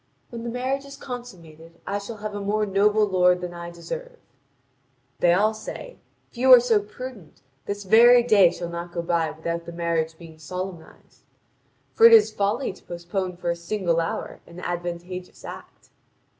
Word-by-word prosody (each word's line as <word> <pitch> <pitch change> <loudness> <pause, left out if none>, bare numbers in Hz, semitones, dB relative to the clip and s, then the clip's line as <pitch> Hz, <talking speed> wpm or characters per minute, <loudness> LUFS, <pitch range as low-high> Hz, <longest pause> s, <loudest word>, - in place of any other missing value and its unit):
When 235 -1 -6
the 235 - -4
marriage 260 +3 -2
is 275 0 -11
consummated, 170 - -10
I 200 +1 -2
shall 215 +2 -8
have 210 0 -6
a 205 - -4
more 210 +2 0
noble 210 +2 +3
lord 180 -2 +3
than 180 -1 -6
I 170 0 -7
deserve." - - -8 1.0
They 175 - +4
all 210 +5 +3
say: - - -8 0.3
"If 235 - -13
you 260 +1 +5
are 235 -3 +3
prudent, 210 -3 -10 0.2
this 205 0 -4
very 240 +5 +7
day 205 -7 +6
shall 170 0 -6
not 170 0 -6
go 170 - -3
by 165 -1 0
without 170 +2 -5
the - - -6
marriage 165 -1 -2
being 160 -2 -13
solemnised. 180 +1 -8 0.7
For 460 - +8
it 465 - +6
is 445 -2 +6
folly 205 +4 -1
to - - -19
postpone 175 +1 -4
for 175 -1 -2
a - - -2
single 170 -1 -1
hour 165 - -4
an 170 +1 -11
advantageous 175 +1 -6
act." - - -11
185 Hz, 170 wpm, -24 LUFS, 170-220 Hz, 1.0 s, For